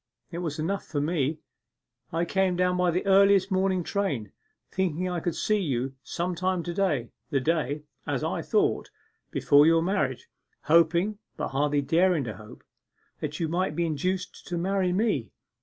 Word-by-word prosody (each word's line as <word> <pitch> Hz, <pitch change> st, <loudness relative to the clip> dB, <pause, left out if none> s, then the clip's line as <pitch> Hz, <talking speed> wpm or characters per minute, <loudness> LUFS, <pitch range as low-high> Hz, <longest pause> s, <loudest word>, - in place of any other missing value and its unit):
It 170 Hz, -, -4 dB
was 160 Hz, -4 st, -3 dB
enough 185 Hz, +6 st, -2 dB
for 145 Hz, -, -3 dB
me 150 Hz, 0 st, -1 dB, 0.7 s
I 165 Hz, +1 st, 0 dB
came 190 Hz, 0 st, +1 dB
down 180 Hz, 0 st, +2 dB
by 180 Hz, 0 st, +2 dB
the 180 Hz, +3 st, -1 dB
earliest 195 Hz, 0 st, +5 dB
morning 190 Hz, -1 st, +1 dB
train, 145 Hz, -, -2 dB, 0.4 s
thinking 185 Hz, -1 st, -1 dB
I 180 Hz, -1 st, -2 dB
could 170 Hz, 0 st, -2 dB
see 215 Hz, -1 st, +1 dB
you 135 Hz, -7 st, -1 dB
some 175 Hz, +7 st, -3 dB
time 185 Hz, 0 st, -1 dB
to 175 Hz, -, -4 dB
day, 160 Hz, -, 0 dB, 0.2 s
the 140 Hz, -4 st, +1 dB
day, 150 Hz, 0 st, -1 dB, 0.2 s
as -, -, -1 dB
I -, -, -1 dB
thought, -, -, +1 dB, 0.4 s
before 145 Hz, +1 st, +5 dB
your 165 Hz, 0 st, +4 dB
marriage, 150 Hz, -9 st, -1 dB, 0.4 s
hoping, 170 Hz, +6 st, +3 dB, 0.2 s
but -, -, -2 dB
hardly 145 Hz, +1 st, +1 dB
daring 170 Hz, +1 st, +3 dB
to 110 Hz, -6 st, -6 dB
hope, 105 Hz, +1 st, -13 dB, 0.6 s
that 150 Hz, 0 st, -4 dB
you 165 Hz, -, 0 dB
might 165 Hz, -2 st, -1 dB
be 170 Hz, -, +1 dB
induced 180 Hz, +4 st, -3 dB
to 175 Hz, -, -3 dB
marry 185 Hz, +1 st, +1 dB
me. 180 Hz, -, 0 dB
170 Hz, 170 wpm, -27 LUFS, 150-185 Hz, 0.7 s, earliest